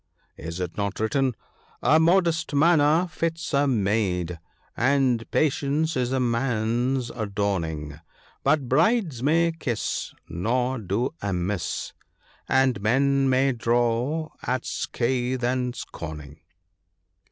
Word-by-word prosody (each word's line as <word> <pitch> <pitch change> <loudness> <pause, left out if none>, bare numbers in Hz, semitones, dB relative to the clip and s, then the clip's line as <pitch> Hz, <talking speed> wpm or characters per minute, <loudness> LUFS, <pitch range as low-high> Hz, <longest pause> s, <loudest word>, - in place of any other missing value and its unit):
Is 85 +2 -6
it 90 -2 -4
not 100 -1 -2
written 125 +3 +1
— - - -35
" - - -31
A 155 - +5
modest 165 -2 +2
manner 160 +2 +4
fits 165 -2 -3
a 140 +1 +3
maid, 95 - 0 0.4
And 130 -3 +2
patience 150 +2 +1
is 125 -1 0
a 130 - +1
man's 120 +1 0
adorning; 95 -9 -3 0.4
But 140 -2 +2
brides 165 - +2
may 165 +4 +3
kiss, 135 -8 -3
nor 125 +9 -1
do 110 - -1
amiss, 95 -2 -2 0.6
And 130 -5 +2
men 135 +5 +2
may 130 +1 +3
draw, 120 +6 0
at 125 0 -2
scathe 125 +1 -1
and 125 0 0
scorning." 75 -6 -8
125 Hz, 115 wpm, -25 LUFS, 105-140 Hz, 0.6 s, A